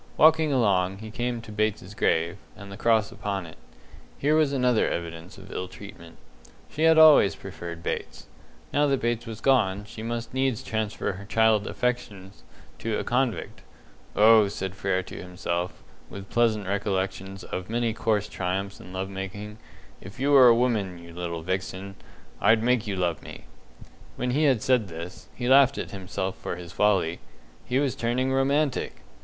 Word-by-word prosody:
Walking 160 -1 +5
along, 95 -7 +2
he 110 +1 -9
came 120 0 -3
to 110 - -10
Bates's 105 -2 -2
grave, 85 -1 +1 0.2
and 100 -1 -11
the - - -7
cross 110 -1 +2
upon 100 -3 -4
it. 80 - -13 0.6
Here 145 +2 +1
was 155 -2 +3
another 125 -4 +2
evidence 85 +1 -6
of 95 0 -12
ill 90 - -4
treatment. 90 -4 -12 0.5
She 155 +2 0
had 160 0 +6
always 155 -10 +7
preferred 85 -3 -8
Bates. - - -4 0.5
Now 145 +1 +3
that 135 -2 +1
Bates 120 0 -1
was 115 -1 -7
gone, 105 -7 +2
she 110 - -9
must 115 +1 -4
needs 130 -3 0
transfer 110 +1 -2
her 100 +1 -9
childish 110 -1 +2
affections 105 -6 -3 0.4
to 110 -1 -2
a - - -2
convict. 125 -1 -1 0.5
"Oh," 110 0 +6
said 95 -2 -4
Frere 95 -1 -1
to - - -9
himself, 90 -1 -4 0.3
with 100 0 -10
pleasant 110 -4 +2
recollections 95 -1 -2
of 90 +1 -6
many 115 0 0
coarse 105 -2 0
triumphs 95 +2 -3
in 100 -5 -12
love 95 +1 -3
making, 100 +2 -7 0.4
"if 100 +6 -11
you 140 +2 +1
were 135 -3 +8
a 120 - +7
woman, 110 -7 0
you 85 0 -12
little 85 -1 -5
vixen, 95 +2 -4 0.5
I'd 110 +1 +4
make 125 -2 +2
you 100 - -2
love 90 -2 -1
me!" - - -10 0.7
When 125 - -2
he 150 +4 +2
had 130 -6 +3
said 125 -5 +2
this, 85 +1 -9
he 120 - -3
laughed 135 +1 +6
at - - -5
himself 95 -1 -4
for - - -5
his 85 -1 -9
folly 95 -5 +1 0.5
he 125 - 0
was 140 -2 +1
turning 125 +3 0
romantic! 140 +1 0
105 Hz, 170 wpm, -26 LUFS, 95-125 Hz, 0.7 s, were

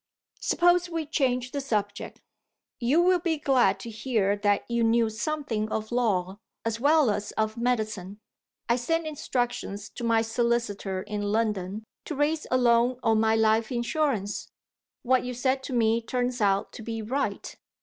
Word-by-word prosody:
Suppose 350 0 +3
we 330 -2 -3
change 255 -4 0
the 280 - -2
subject. 215 -7 -3 0.6
You 280 +8 +3
will 365 0 +4
be 330 -2 0
glad 250 -9 +3
to 230 - -7
hear 215 -3 0
that 205 0 +1
you 235 0 0
knew 225 0 +3
something 220 -2 -2
of 220 +1 -3
law, 200 -6 0 0.3
as 230 0 -1
well 290 -2 +4
as 205 0 -3
of 220 0 -1
medicine. 215 -5 -2 0.5
I 235 +1 +3
sent 330 +7 -1
instructions 245 -8 -3
to - - -8
my 230 -1 +3
solicitor 225 -5 -1
in 210 0 -4
London 210 -2 -1 0.2
to 310 - -4
raise 300 +2 0
a 255 - +3
loan 240 0 +3
on 225 -1 +3
my 220 0 +3
life 220 +1 +2
insurance. 240 -4 -1 0.5
What 255 +1 +3
you 250 0 -4
said 260 +2 0
to 265 - -5
me 230 -1 +2
turns 245 +1 -2
out 200 -1 +2
to - - -9
be 225 0 -4
right. 265 +6 -3
235 Hz, 160 wpm, -27 LUFS, 215-260 Hz, 0.6 s, will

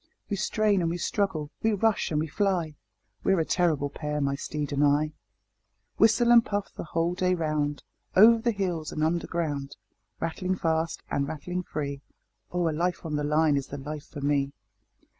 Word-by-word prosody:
We - - +2
strain 210 0 +1
and 165 - +1
we 170 - -2
struggle, 170 -6 -1
we 220 0 +2
rush 220 +1 +1
and 150 - 0
we 155 - 0
fly 170 -2 0 0.5
We're 195 -2 +3
a 160 - +1
terrible 155 -6 +1
pair, 150 0 -3
my 140 -1 +1
steed 150 +1 -4
and 140 +1 +2
I. 145 +1 +3
Chorus - - -22 0.9
Whistle 235 +2 +5
and 235 -1 +8
puff 205 -2 -3
the - - -6
whole 165 +2 0
day 185 0 +1
round, 150 -3 -1 0.3
Over 225 +4 +8
the 235 +1 0
hills 180 -7 -2
and 155 - -2
underground. 160 -4 -1 0.4
Rattling 180 +3 -1
fast 165 -1 -1
and 140 0 0
rattling 170 +4 -4
free 140 -5 -4 0.5
Oh! 175 -1 +1
a - - +1
life 175 +3 -1
on 155 -2 -2
the 150 - -1
line 150 0 +3
is 140 -1 -1
the 145 - -6
life 145 +1 -7
for 145 - -8
me. 140 -1 +1
160 Hz, 185 wpm, -27 LUFS, 150-185 Hz, 0.9 s, and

